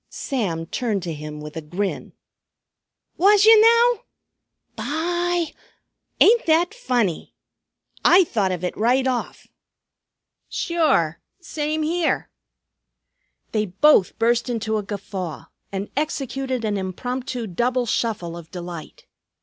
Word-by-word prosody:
Sam 185 Hz, -12 st, -3 dB
turned 210 Hz, -1 st, -2 dB
to 170 Hz, -2 st, -3 dB
him 150 Hz, 0 st, -7 dB
with 150 Hz, 0 st, -9 dB
a 160 Hz, -, -4 dB
grin. 185 Hz, +6 st, -4 dB, 1.0 s
"Was 410 Hz, +3 st, +5 dB
yer 445 Hz, 0 st, +9 dB
now? 465 Hz, +1 st, +5 dB, 0.7 s
By! 345 Hz, +2 st, -1 dB, 0.7 s
Ain't 460 Hz, -1 st, +5 dB
that 335 Hz, +5 st, +3 dB
funny? 245 Hz, -, -1 dB, 0.7 s
I 370 Hz, +2 st, +7 dB
thought 205 Hz, -, 0 dB
of 180 Hz, -1 st, -4 dB
it 180 Hz, -, -2 dB
right 250 Hz, +4 st, +2 dB
off." 255 Hz, -2 st, -2 dB, 1.0 s
"Sure. 280 Hz, -, +1 dB, 0.2 s
Same 310 Hz, -2 st, -2 dB
here!" 335 Hz, +1 st, 0 dB, 1.2 s
They 215 Hz, -1 st, 0 dB
both 200 Hz, +1 st, +4 dB
burst 235 Hz, +2 st, +1 dB
into 220 Hz, -2 st, -1 dB
a -, -, -1 dB
guffaw 195 Hz, -6 st, -6 dB, 0.3 s
and 195 Hz, +1 st, -3 dB
executed 270 Hz, -4 st, -2 dB
an 210 Hz, -1 st, 0 dB
impromptu 245 Hz, +6 st, -4 dB
double 240 Hz, +6 st, 0 dB
shuffle 210 Hz, -7 st, -2 dB
of 170 Hz, -2 st, -10 dB
delight. 175 Hz, -3 st, -8 dB
240 Hz, 115 wpm, -22 LUFS, 185-315 Hz, 1.2 s, yer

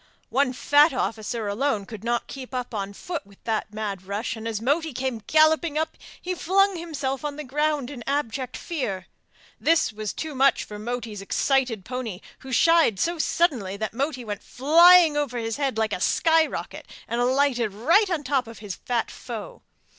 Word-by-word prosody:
One 265 Hz, +2 st, +2 dB
fat 290 Hz, +4 st, +4 dB
officer 225 Hz, -2 st, -2 dB
alone 215 Hz, 0 st, 0 dB
could 220 Hz, 0 st, -9 dB
not 240 Hz, 0 st, 0 dB
keep 260 Hz, -1 st, -8 dB
up 250 Hz, -1 st, -4 dB
on 200 Hz, -2 st, -3 dB
foot 340 Hz, -, -5 dB
with 200 Hz, 0 st, -20 dB
that 220 Hz, -2 st, -2 dB
mad 210 Hz, -3 st, -4 dB
rush, 200 Hz, +5 st, -3 dB
and 225 Hz, 0 st, -6 dB
as 220 Hz, -2 st, -2 dB
Moti 295 Hz, +6 st, 0 dB
came 255 Hz, -2 st, -3 dB
galloping 315 Hz, 0 st, +4 dB
up 315 Hz, 0 st, -1 dB, 0.2 s
he 365 Hz, -, -3 dB
flung 390 Hz, +2 st, +2 dB
himself 290 Hz, -6 st, -3 dB
on 295 Hz, -1 st, -3 dB
the 300 Hz, -, -6 dB
ground 295 Hz, 0 st, -1 dB
in 250 Hz, -5 st, -8 dB
abject 265 Hz, -3 st, -2 dB
fear. 210 Hz, -, -4 dB, 0.5 s
This 325 Hz, -8 st, +2 dB
was 215 Hz, -1 st, -4 dB
too 315 Hz, -1 st, -5 dB
much 270 Hz, +1 st, +3 dB
for 210 Hz, 0 st, -9 dB
Moti's 230 Hz, -2 st, -4 dB
excited 250 Hz, -1 st, 0 dB
pony, 245 Hz, -7 st, -5 dB, 0.2 s
who 265 Hz, -, -10 dB
shied 320 Hz, -, +4 dB
so 340 Hz, 0 st, 0 dB
suddenly 245 Hz, -, +1 dB
that 215 Hz, -1 st, -3 dB
Moti 265 Hz, 0 st, -2 dB
went 205 Hz, -2 st, -5 dB
flying 330 Hz, +4 st, +6 dB
over 285 Hz, -4 st, -1 dB
his 225 Hz, 0 st, -3 dB
head 275 Hz, -5 st, -1 dB
like 220 Hz, -1 st, 0 dB
a 180 Hz, -, -3 dB
sky 325 Hz, -, +3 dB
rocket, -, -, -7 dB, 0.2 s
and 235 Hz, +1 st, -1 dB
alighted 250 Hz, -3 st, +2 dB
right 330 Hz, -, +3 dB
on 340 Hz, -5 st, -1 dB
the -, -, -16 dB
top 265 Hz, -2 st, 0 dB
of 230 Hz, -1 st, -10 dB
his 205 Hz, -2 st, -6 dB
fat 240 Hz, -2 st, -2 dB
foe. 230 Hz, -4 st, -8 dB
255 Hz, 185 wpm, -25 LUFS, 220-300 Hz, 0.5 s, flying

